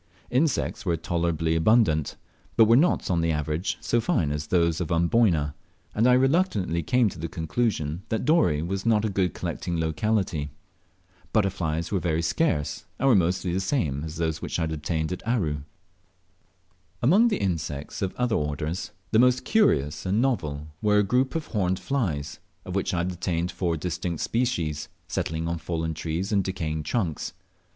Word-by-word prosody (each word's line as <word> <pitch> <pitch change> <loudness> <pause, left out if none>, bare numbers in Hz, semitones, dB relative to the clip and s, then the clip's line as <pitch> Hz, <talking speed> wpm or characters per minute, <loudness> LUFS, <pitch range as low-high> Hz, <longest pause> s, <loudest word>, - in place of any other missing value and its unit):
Insects 135 +3 +1
were 85 -4 0
tolerably 85 -1 0
abundant, 80 - +3 0.4
but 115 - +8
were 115 +2 +5
not 155 - +3
on 85 -2 +2
the 85 0 +1
average 75 +3 -1
so 120 - +1
fine 80 -8 +1
as 75 0 -3
those 85 -1 +2
of 85 - -3
Amboyna, 85 -3 +2 0.4
and 115 +3 +3
I 125 - +6
reluctantly 130 - +2
came 125 +8 +3
to 85 - -11
the 85 - -3
conclusion 80 -1 -1
that 110 - -1
Dorey 115 - +3
was 95 +3 -3
not 110 -2 +3
a - - +1
good 95 -3 0
collecting 85 -2 -3
locality. 80 -2 0 0.8
Butterflies 85 -5 0
were 100 - +1
very 85 -2 0
scarce, 75 -2 0
and 135 - +2
were 125 - +6
mostly 90 0 +1
the 95 - +1
same 80 - -1
as 80 0 -6
those 80 -1 -2
which - - -3
I 85 - 0
had 80 - -2
obtained 80 +1 -2
at 90 - -4
Aru. 80 - 0 1.4
Among 195 - +5
the 230 - +1
insects 80 -7 -3
of 95 -2 -2
other 125 -2 0
orders, 75 +4 -2 0.2
the 110 - +4
most 125 +1 +4
curious 75 - +2
and 95 +4 +1
novel 80 - -1
were 105 -1 +3
a 105 - +5
group 125 +8 +1
of 160 -1 -1
horned 95 -4 0
flies, 80 - -2 0.3
of 90 - -6
which 95 +1 0
I 85 - +1
obtained 90 -1 -2
four 85 -2 -1
distinct 85 0 -3
species, 85 -12 -1 0.2
settling 80 +1 -2
on 85 0 -2
fallen 80 -1 -2
trees 80 +5 -3
and 100 -2 +2
decaying 80 -4 -3
trunks. 80 - -2
85 Hz, 170 wpm, -26 LUFS, 80-110 Hz, 1.4 s, but